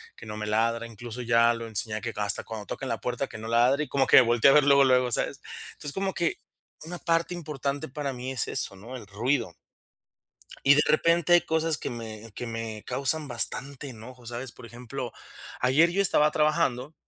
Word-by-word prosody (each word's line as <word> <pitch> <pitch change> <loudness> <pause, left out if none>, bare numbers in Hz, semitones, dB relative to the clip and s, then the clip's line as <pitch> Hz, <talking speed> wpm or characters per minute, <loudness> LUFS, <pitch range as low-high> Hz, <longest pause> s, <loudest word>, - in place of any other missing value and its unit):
que - - -12
no 105 0 -6
me 105 - -4
ladra, 115 +2 0
incluso 115 +2 -8
ya 115 0 +4
lo 115 0 -6
enseñé 110 0 0
que 120 -1 -4
hasta 105 -2 0
cuando 110 -2 -8
tocan 135 - -5
la 115 -2 -3
puerta, 125 +2 -2
que 110 - -10
no 110 - -7
ladre 120 +5 +3
y - - -16
como 135 -1 +1
que - - +7
me - - +10
voltee 120 +2 +4
a - - +5
ver 150 - +6
luego, 140 0 +5
luego, 125 -2 +3
¿sabes? - - -1 0.3
Entonces, 145 - -5
como 195 0 -2
que 170 -1 -1 0.5
una 175 +2 -6
parte 165 +1 0
importante 145 -4 -4
para 140 0 -4
mí 125 +1 -5
es 130 -4 0
eso, 95 - -3
¿no? 115 +7 -10
El 115 -5 -9
ruido. 115 -1 -1 1.1
Y 140 - +8
de 150 - +4
repente 170 +2 +3
hay 175 - +8
cosas 160 -1 0
que - - -5
me 115 -2 -8
que 120 - -6
me 115 -2 -6
causan 150 +3 0
bastante 135 +4 0
enojo, 125 +1 -12
¿sabes? 120 +1 -6
Por - - -14
ejemplo, 120 +1 -7 0.5
ayer 140 +7 +4
yo 190 +3 0
estaba 150 -6 +5
trabajando 150 -3 0
125 Hz, 205 wpm, -27 LUFS, 115-145 Hz, 1.1 s, me